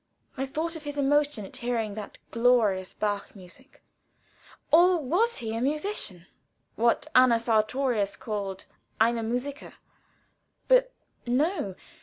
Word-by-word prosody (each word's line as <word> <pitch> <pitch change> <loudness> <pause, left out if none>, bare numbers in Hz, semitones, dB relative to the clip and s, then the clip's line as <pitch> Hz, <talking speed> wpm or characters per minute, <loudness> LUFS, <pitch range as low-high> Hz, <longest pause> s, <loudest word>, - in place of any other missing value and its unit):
I 270 +1 -3
thought 325 +5 -3
of 320 - -7
his 290 -1 -6
emotion 285 -5 +1
at - - -8
hearing 230 -3 -2
that 210 -1 -8
glorious 230 -6 +2
Bach 205 -1 -3
music. 195 +8 -16 0.9
Or 355 +3 +6
was 360 - +1
he 225 -3 -4
a 230 - -2
musician 285 - -2 0.5
what 235 +1 +2
Anna 255 -2 +6
Sartorius 225 -1 +1
called 200 -3 -5 0.3
ein 230 +2 +3
Musiker? 275 +4 -4 0.9
But - - +4 0.4
no. 255 - 0
245 Hz, 120 wpm, -27 LUFS, 215-290 Hz, 0.9 s, Or